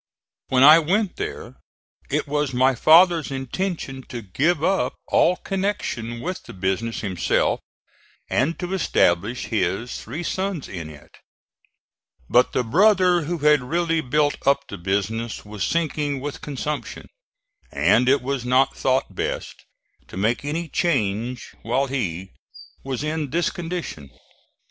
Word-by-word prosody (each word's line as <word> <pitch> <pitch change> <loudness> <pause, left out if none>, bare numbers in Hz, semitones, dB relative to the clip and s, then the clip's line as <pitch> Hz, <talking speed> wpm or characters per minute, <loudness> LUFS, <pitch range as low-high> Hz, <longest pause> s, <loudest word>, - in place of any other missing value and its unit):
When 130 0 +3
I 155 +3 +10
went 190 +5 0
there - - -6 0.5
it - - 0
was 145 -2 -1
my 130 +2 +4
father's 165 +4 +5
intention 135 +1 -4
to 120 -2 -6
give 145 - 0
up 195 +2 +1
all 180 - +4
connection 180 - -3
with 185 +4 -4
the - - -12
business 95 +5 -2
himself, 95 -5 0 0.7
and 140 +7 0
to 180 +1 -4
establish 115 - +1
his 100 +4 -1
three 150 +10 -6
sons 190 -4 -2
in 85 -5 -7
it: 75 -2 -14 1.2
but 125 +1 +4
the 125 - 0
brother 180 - +4
who 175 +3 -2
had 150 -2 +4
really 165 +4 0
built 145 +2 +1
up 140 0 +2
the - - -8
business 100 +6 -2
was 105 -1 -5
sinking 150 -4 -1
with 145 +2 -6
consumption, 150 +1 -5 0.6
and 125 +1 +3
it 140 -1 +3
was 135 -1 -2
not 130 +2 +2
thought 130 -6 0
best - - -3 0.5
to - - -10
make 110 +7 0
any 160 +4 -3
change 125 - -1
while 125 +4 0
he 95 -9 -3 0.5
was 135 0 -3
in 155 -1 -2
this 165 +4 0
condition. 170 - -6
135 Hz, 135 wpm, -23 LUFS, 115-165 Hz, 1.2 s, I